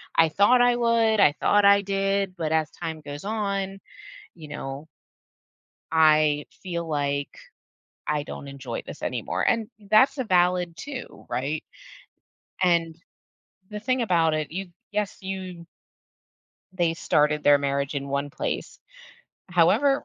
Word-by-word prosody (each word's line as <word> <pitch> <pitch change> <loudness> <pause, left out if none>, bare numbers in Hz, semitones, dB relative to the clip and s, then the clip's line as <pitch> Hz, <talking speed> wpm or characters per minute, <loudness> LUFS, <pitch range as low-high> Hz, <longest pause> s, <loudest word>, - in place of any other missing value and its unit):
"I 165 -1 +5
thought 205 +9 +4
I 245 0 +4
would. 230 -2 +2
I 175 - +6
thought 205 +6 +3
I 200 0 +6
did." 195 -1 -1
But 160 -2 -2
as 160 -2 +1
time 160 -1 -6
goes 145 0 -8
on, 200 -2 -2 0.6
you 155 -3 -11
know 140 0 -7 1.0
"I 155 -2 +4 0.2
feel 170 -3 -4
like 140 -2 -2 0.7
I 150 -1 -1
don't 140 - -8
enjoy 140 -1 -6
this - - -10
anymore." - - -2
And 230 -3 +1 0.2
that's 260 +7 +5
a 260 - -1
valid 180 -2 +2
too, 265 +5 -8
right? 145 +5 -2 1.0
And 170 -3 +2 0.7
the 210 0 -6
thing 255 +3 0
about 165 -7 +2
it, 155 -1 -2
you 190 +1 -5 0.2
yes, 210 -1 -2
you 185 -3 -6 1.1
they 175 -3 +1
started 150 -2 +1
their 145 0 +6
marriage 140 0 -2
in 140 0 -3
one 140 +1 -2
place. 145 - -4 0.7
However, 270 - +3
170 Hz, 135 wpm, -25 LUFS, 150-200 Hz, 1.1 s, I